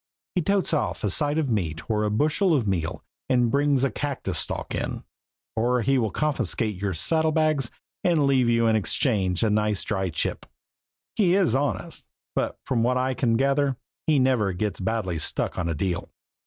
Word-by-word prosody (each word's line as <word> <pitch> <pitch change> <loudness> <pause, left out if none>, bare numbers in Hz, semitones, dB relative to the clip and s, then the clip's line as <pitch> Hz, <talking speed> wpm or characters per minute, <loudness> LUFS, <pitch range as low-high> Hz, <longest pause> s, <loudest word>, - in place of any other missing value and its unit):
He 180 - +1
totes 195 +1 +1
off 150 - -1
a 105 - +1
side 145 +4 +1
of 155 -3 +1
meat 85 -10 -2
or 105 -2 0
a 105 - +1
bushel 155 - +2
of 120 -7 0
meal 85 -4 -2 0.3
and 125 -3 +3
brings 140 -1 +2
a 135 - +2
cactus 140 +4 -2
stalk - - -3
in; - - -3 0.5
or 120 +2 +1
he 135 +1 +2
will 110 -3 0
confiscate 115 - -1
your 100 -2 -1
saddlebags 155 -4 +2 0.3
and 170 -6 +3
leave 130 -3 +3
you 115 0 +3
in 110 -1 +3
exchange 95 - +1
a 110 - +2
nice 105 -1 +1
dry 95 -3 -1
chip. 80 - -2 0.7
He 185 -4 +3
is 185 - +3
honest, 135 -4 -2 0.3
but - - -1
from 120 -3 0
what 125 +2 +2
I 130 +1 0
can 115 -3 +1
gather 140 0 +1 0.3
he 155 -2 +4
never 125 -7 +2
gets 105 +3 -2
badly 95 -4 -2
stuck 85 +3 -1
on 85 -2 -1
a 85 - -1
deal. 90 +2 -2
120 Hz, 180 wpm, -25 LUFS, 105-145 Hz, 0.7 s, he